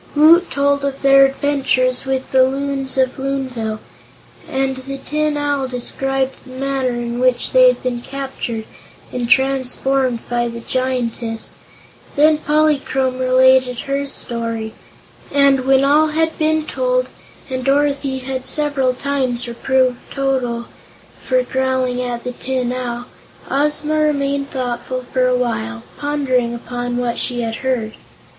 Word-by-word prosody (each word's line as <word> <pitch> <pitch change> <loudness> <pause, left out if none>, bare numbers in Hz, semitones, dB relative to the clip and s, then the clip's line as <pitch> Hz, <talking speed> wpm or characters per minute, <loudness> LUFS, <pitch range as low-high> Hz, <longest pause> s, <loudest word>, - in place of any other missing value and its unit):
Woot 330 +4 +6
told 280 0 +1
of 275 0 -3
their 275 0 +7
adventures 270 -2 +1
with 265 0 -2
the 265 - +5
Loons 270 0 -1
of 260 0 +1
Loonville, 260 -5 -2 0.7
and 265 0 -1
the 275 +1 -6
Tin 300 +2 -1
Owl 285 -2 0
described 265 +1 -2
the 265 - -15
manner 270 0 -1
in 240 0 -3
which 255 -1 +2
they - - +7
had - - +2
been 245 -2 -2
captured 265 -5 -5 0.5
and 245 -1 -2
transformed 265 -1 +1
by 240 0 0
the 235 0 -6
Giantess. 240 -3 -2 0.6
Then 300 +1 +5
Polychrome 285 -4 +1
related 255 -1 +4
her 275 +1 -2
story, 230 -4 -4 0.6
and 275 -2 +4
when 270 0 +5
all 300 +3 +4
had 320 +1 0
been 315 0 +1
told, - - 0 0.4
and 255 -1 -3
Dorothy 275 0 +1
had 260 0 -5
several 285 -4 0
times 260 -3 -1
reproved 255 +1 +1
Toto 255 -4 -1 0.6
for 255 -1 +2
growling 260 -1 0
at 245 -1 -3
the 250 - -3
Tin 250 0 -2
Owl, 245 -1 -4 0.5
Ozma 300 +2 +1
remained 280 -2 0
thoughtful 255 0 -3
for 255 -1 +3
a 250 0 +2
while, 110 - -2 0.2
pondering 260 -5 0
upon 245 0 -4
what 240 -1 -1
she 245 -1 -2
had 225 -1 -3
heard. 245 -5 -1
260 Hz, 135 wpm, -19 LUFS, 250-280 Hz, 0.7 s, their